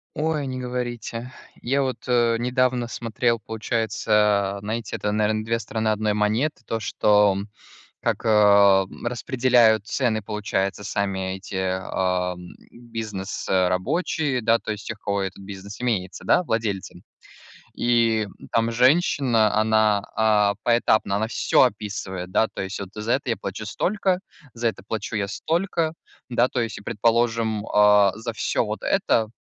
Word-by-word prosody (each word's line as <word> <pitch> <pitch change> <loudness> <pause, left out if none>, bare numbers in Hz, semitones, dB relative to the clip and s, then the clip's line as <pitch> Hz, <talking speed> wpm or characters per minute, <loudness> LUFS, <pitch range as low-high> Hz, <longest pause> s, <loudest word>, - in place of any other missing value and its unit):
Ой, 155 -2 -1
не 130 -1 -4
говорите. 125 -1 -5 0.3
Я 135 +3 +1
вот, 130 -1 -3
э, 120 -2 +3
недавно 125 0 0
смотрел, 115 0 -1
получается, 105 -2 0
знаете, 110 +1 -4
это, 105 - -2
наверное, 110 0 0
2 115 +1 0
стороны 110 -1 -3
одной 110 0 +1
монеты, 110 +8 0
то, 115 - -2
что, 105 -2 +3
м, 100 +2 -5 0.5
как, - - -1
а, 100 -3 +5 0.2
распределяют 120 -3 +3
цены, 115 -5 0
получается, 105 -1 -2
сами 95 -2 -2
эти, 95 0 -8
а, 95 -1 -1 0.4
бизнес 110 -5 -6
а, 95 -1 +3
рабочие, 135 - -1
да, 115 0 +3
то - - -7
есть 105 -1 -8
тех, 115 - -4
у - - -34
кого 100 -1 0
этот 95 +1 -5
бизнес 100 +1 -9
имеется, 100 -7 -2
да, - - +4
владельцы. 105 - -3 0.7
И 115 -2 +2 0.2
там 115 0 +1
женщина, 125 -4 +3
она, 110 -2 +3
а, 105 -2 +3
поэтапно 110 -4 +2
она 110 +2 0
всё 120 - +3
описывает, 100 -5 -4
да, 110 - +3
то - - -6
есть, 95 +2 -5
вот 100 - -5
за 110 +2 -2
это 135 - -1
я 115 - +1
плачу 100 +2 -6
столько, 190 - 0 0.3
за 120 0 0
это 110 - -6
плачу 110 0 -4
я 100 -1 -1
столько, 165 - -1 0.4
да, 120 +1 +3
то 125 - -2
есть, 115 -3 -5
предположим, 115 -1 0
а, 105 -2 +5
за 115 +1 -5
всё - - 0
вот - - -5
это 110 -1 +1
110 Hz, 150 wpm, -23 LUFS, 100-120 Hz, 0.7 s, а